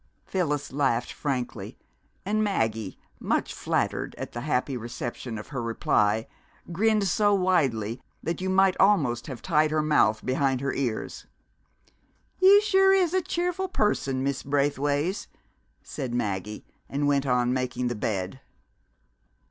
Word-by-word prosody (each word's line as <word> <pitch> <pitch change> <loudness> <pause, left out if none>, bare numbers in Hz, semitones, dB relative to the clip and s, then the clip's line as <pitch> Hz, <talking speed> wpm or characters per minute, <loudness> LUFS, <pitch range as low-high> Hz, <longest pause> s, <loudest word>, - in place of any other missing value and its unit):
Phyllis 150 -7 -2
laughed 135 -4 0
frankly, 130 -4 -4 0.5
and 215 +2 +1
Maggie, 110 - -1 0.2
much - - -1
flattered - - -2
at - - -6
the 120 - -5
happy 135 -1 -1
reception 120 0 -5
of 110 - -9
her 135 -4 -4
reply, 110 -1 +1 0.5
grinned 210 +2 +2
so 205 +2 +3
widely 130 - +1 0.2
that 170 +3 -3
you 190 - -1
might 190 0 +4
almost 140 -13 +3
have 130 -4 -7
tied 155 -3 +3
her 155 0 +1
mouth 110 -8 +2
behind 135 0 +1
her 140 0 -2
ears. 120 -5 -3 1.1
"You 395 +2 +7
sure 385 -2 +4
is 370 -3 +2
a 375 - +2
cheerful 360 +2 -2
person, 140 - 0
Miss 140 -1 -1
Braithways!" 145 +5 0 0.6
said 130 -5 -5
Maggie, 105 -2 -3 0.2
and 145 +1 -1
went 140 -1 +1
on 125 -1 +2
making 125 -1 -1
the 120 - -1
bed. 105 +1 -3
140 Hz, 135 wpm, -26 LUFS, 120-185 Hz, 1.1 s, You